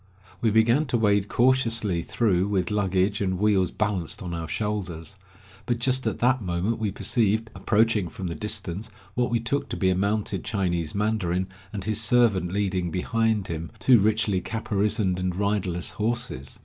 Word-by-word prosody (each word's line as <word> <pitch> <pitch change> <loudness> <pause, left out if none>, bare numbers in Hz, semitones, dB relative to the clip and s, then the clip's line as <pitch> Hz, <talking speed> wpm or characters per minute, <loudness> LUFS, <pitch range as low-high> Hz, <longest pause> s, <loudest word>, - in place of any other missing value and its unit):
We 115 - +3
began 115 +7 +3
to 125 - +1
wade 105 -2 +2
cautiously 115 -7 +2
through 95 -2 +1
with 95 -1 0
luggage 100 0 +1
and 95 -2 0
wheels 95 -3 +2
balanced 100 -6 -2
on 90 -1 -5
our 85 -1 -4
shoulders. 95 -3 -4 0.5
But 120 -1 +1
just 130 0 +1
at 110 - -1
that 125 +1 +2
moment 95 +5 -1
we 110 -2 0
perceived, 110 +2 0
approaching 110 -4 +1
from 95 -4 -7
the 85 - -2
distance, 105 0 -3 0.2
what 125 +2 0
we 120 -1 +1
took 120 +5 -2
to - - -4
be 95 -2 +2
a - - +1
mounted 100 -1 -1
Chinese 85 -6 -1
mandarin, 95 -4 0 0.2
and 100 -3 -5
his 110 +2 +1
servant 110 -7 +3
leading 95 -3 -1
behind 110 +4 0
him 85 0 -4
two 125 -3 +5
richly 105 -2 +1
caparisoned 105 -3 0
and 90 -1 -1
riderless 95 -3 -1
horses. 110 - -3
105 Hz, 165 wpm, -25 LUFS, 95-110 Hz, 0.5 s, two